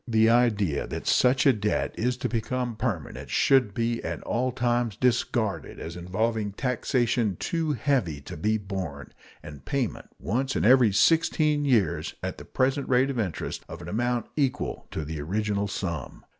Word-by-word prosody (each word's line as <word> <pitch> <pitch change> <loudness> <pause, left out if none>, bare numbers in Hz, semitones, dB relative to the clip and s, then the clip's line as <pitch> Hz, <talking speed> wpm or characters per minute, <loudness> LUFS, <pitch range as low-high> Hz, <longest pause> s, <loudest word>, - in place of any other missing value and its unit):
The 110 -1 +4
idea 105 -10 +2
that - - -5
such 125 0 +3
a 135 - +7
debt 105 -1 -1
is 125 +2 0
to - - -2
become 120 +1 -2
permanent 85 - -4
should 130 - +3
be 115 0 -1
at - - -4
all 125 +2 0
times 120 -3 0
discarded 120 -3 0
as 85 - -6
involving 105 +4 -1
taxation 120 -3 0
too 160 - -1
heavy 120 - 0
to - - -8
be 110 +8 +1
borne, 95 -8 -6 0.3
and 75 -2 -10
payment 135 -6 -2
once 130 +6 -1
in - - +1
every 125 -2 +6
sixteen 150 +4 +3
years, 120 -8 +1
at - - -4
the - - -10
present 135 +2 0
rate 130 +2 +3
of 125 - -3
interest, 95 -7 -3
of 80 - -7
an 85 - -9
amount 120 +4 0
equal 135 -4 -1
to 80 - -4
the 80 0 -5
original 100 +5 -1
sum. 85 -8 -5
115 Hz, 165 wpm, -26 LUFS, 100-125 Hz, 0.3 s, a